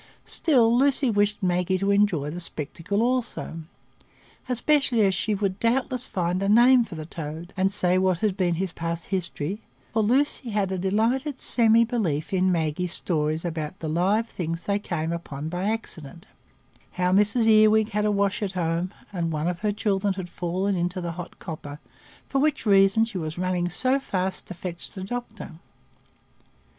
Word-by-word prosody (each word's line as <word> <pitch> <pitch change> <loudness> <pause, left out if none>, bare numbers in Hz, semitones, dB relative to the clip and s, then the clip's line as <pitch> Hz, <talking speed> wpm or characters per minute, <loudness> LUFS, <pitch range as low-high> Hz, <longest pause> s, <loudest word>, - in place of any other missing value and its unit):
Still 240 -7 +3
Lucy 270 0 +2
wished 205 0 +1
Maggie 180 +1 +1
to 195 +2 0
enjoy 190 -8 +2
the 175 +2 -6
spectacle 170 +6 -2
also, 245 -9 -2 0.9
especially 255 -1 +3
as 195 -2 +3
she 210 +3 -1
would 195 -1 -2
doubtless 250 +1 +2
find 180 0 -1
a 195 - 0
name 240 +3 +6
for 205 - -9
the 155 -1 -6
toad, 160 +2 -7
and 190 0 +1
say 185 -2 +2
what 185 -2 +1
had 210 -4 +1
been 180 -4 +1
his 185 +1 -2
past 165 0 -4
history; 185 +1 -2 0.3
for 220 - +2
Lucy 255 +3 +1
had 205 -3 -1
a 190 - -1
delighted 235 - 0
semi 230 -1 +5
belief 185 -10 -2
in 185 0 +2
Maggie's 165 +1 -1
stories 155 -1 -1
about 160 0 -4
the 160 - -6
live 190 +8 +1
things 170 -4 -5
they 200 0 0
came 165 -5 -3
upon 155 -3 -5
by 180 +3 -3
accident,—how 180 -2 -6
Mrs 210 +4 +4
Earwig 215 0 +5
had 210 0 -1
a 210 - +2
wash 200 -1 0
at 195 -2 -2
home, 170 0 -1 0.2
and 170 -3 -2
one 155 +1 -2
of 175 -1 -2
her 210 +1 0
children 200 -1 0
had 185 -2 -6
fallen 185 +3 -2
into 180 +1 -2
the 175 -1 -4
hot 175 0 -8
copper, 145 -3 -8 0.5
for 275 - 0
which 300 -3 0
reason 195 +2 +5
she 220 -5 -5
was 155 0 -5
running 180 -1 -1
so 255 +9 +1
fast 190 -7 -3
to 185 - -7
fetch 175 -1 -7
the 190 - -7
doctor. 230 0 -6
190 Hz, 170 wpm, -25 LUFS, 170-220 Hz, 0.9 s, name